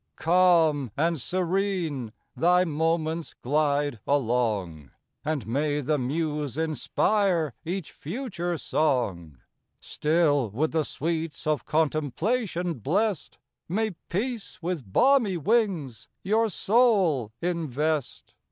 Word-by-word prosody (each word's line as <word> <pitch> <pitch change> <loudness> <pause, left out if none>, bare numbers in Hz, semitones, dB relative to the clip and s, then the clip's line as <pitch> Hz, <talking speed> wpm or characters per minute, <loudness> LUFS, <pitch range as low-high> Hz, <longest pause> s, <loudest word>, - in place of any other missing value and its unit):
Calm 165 -6 +3
and 165 -1 +1
serene 180 - -1 0.2
thy 180 +2 +4
moments 160 +1 -1
glide 145 -2 +1
along, 110 - 0 0.3
And 150 -3 -2
may 145 +5 0
the 150 +1 0
muse 150 0 -2
inspire 160 - +1
each 180 0 -4
future 175 - -4
song! 100 - -1 0.4
Still, 150 -6 +1
with 140 +10 -1
the 160 -2 +1
sweets 160 0 -3
of 155 -2 0
contemplation 165 - 0
bless'd, 195 - -1 0.3
May 220 +4 0 0.2
peace 225 +3 -3
with 165 - -4
balmy 245 - +4
wings 165 - 0 0.2
your 220 +3 +2
soul 195 - +2
invest! 155 -4 -2
160 Hz, 95 wpm, -26 LUFS, 140-180 Hz, 0.4 s, thy